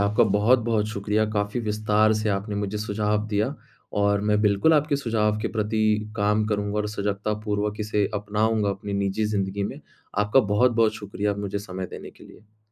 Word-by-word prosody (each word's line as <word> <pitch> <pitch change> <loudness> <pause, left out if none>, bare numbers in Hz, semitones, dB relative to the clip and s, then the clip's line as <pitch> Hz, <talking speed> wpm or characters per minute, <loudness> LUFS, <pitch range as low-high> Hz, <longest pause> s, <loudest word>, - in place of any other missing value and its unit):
आपका 100 +2 +3
बहुत-बहुत 110 0 +3
शुक्रिया। 105 +1 0
काफ़ी 105 +2 -1
विस्तार 105 0 +2
से 110 - -1
आपने 100 +1 -2
मुझे 100 +1 -2
सुझाव 105 0 -1
दिया 105 0 0 0.5
और 100 0 +2
मैं 105 0 +3
बिल्कुल 105 +9 +4
आपके 150 -1 +2
सुझाव 110 -5 0
के - - -1
प्रति 110 +1 0 0.3
काम 105 +1 +2
करूँगा 105 -1 -1
और 105 0 -1
सजगतापूर्वक 105 +1 -2
इसे 105 -1 0
अपनाऊँगा 105 +1 0
अपनी 100 +1 -5
निजी 100 +2 0
ज़िंदगी 100 -1 -1
में। - - -6 0.4
आपका 105 +6 +4
बहुत-बहुत 115 -1 +3
शुक्रिया 105 0 -3
मुझे 100 0 -3
समय 95 -2 -6
देने - - -8
के - - -17
लिए। 110 0 -18
105 Hz, 165 wpm, -25 LUFS, 100-110 Hz, 0.5 s, बिल्कुल